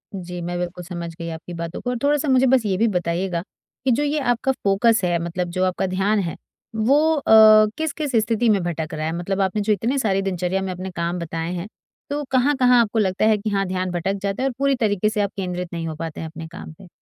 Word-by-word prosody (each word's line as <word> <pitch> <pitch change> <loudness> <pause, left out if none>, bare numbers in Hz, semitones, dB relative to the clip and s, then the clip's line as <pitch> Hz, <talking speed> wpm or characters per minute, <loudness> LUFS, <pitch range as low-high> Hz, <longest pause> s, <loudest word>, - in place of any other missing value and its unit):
जी, 180 -1 -6
मैं 175 +1 -3
बिल्कुल 180 0 -4
समझ 170 -1 -6
गई 170 0 -4
आपकी 165 +2 -8
बातों 170 0 -5
को 245 - -3
और 245 - -1
थोड़ा-सा 295 +1 +2
मुझे 260 0 +4
बस 255 -3 +3
ये 195 -2 +1
भी 230 +3 +3
बताइएगा, 175 -2 -1 0.4
कि 260 - +3
जो 260 +5 +2
ये 295 +1 0
आपका 245 -1 +1
फोकस 210 +3 +3
है, 175 -1 +2
मतलब 175 +1 -3
जो 185 +1 -1
आपका 185 +1 -1
ध्यान 195 +3 +1
है, 170 -4 -3 0.4
वो 285 +9 +3
अ, 220 -5 +7
किस-किस 305 -3 -2
स्थिति 230 +2 +1
में 205 -3 +3
भटक 165 -1 -3
रहा 155 0 -3
है 160 - -1
मतलब 195 +3 -2
आपने 195 +2 0
जो 210 +1 +2
इतने 235 +7 -1
सारे 195 -5 +1
दिनचर्या 185 0 -1
में 190 -1 -3
अपने 185 +1 -6
काम 170 +1 -2
बताए 165 +1 -4
हैं, 180 +2 -4 0.4
तो 290 +1 -2
कहाँ-कहाँ 255 -1 +4
आपको 225 0 0
लगता 190 0 +1
है 220 -1 +4
कि 215 +2 -3
हाँ 195 -1 0
ध्यान 185 0 -2
भटक 180 +2 -1
जाता 200 +5 -2
है - - +2
और - - -6
पूरी 275 0 +2
तरीके 210 -4 +1
से 215 -1 -1
आप 200 0 -1
केंद्रित 180 -2 -4
नहीं 165 -1 -3
हो 160 - -4
पाते 160 0 -6
हैं 160 - -4
अपने 160 0 -8
काम 165 0 -10
पे? 185 +3 -15
195 Hz, 245 wpm, -22 LUFS, 175-230 Hz, 0.4 s, अ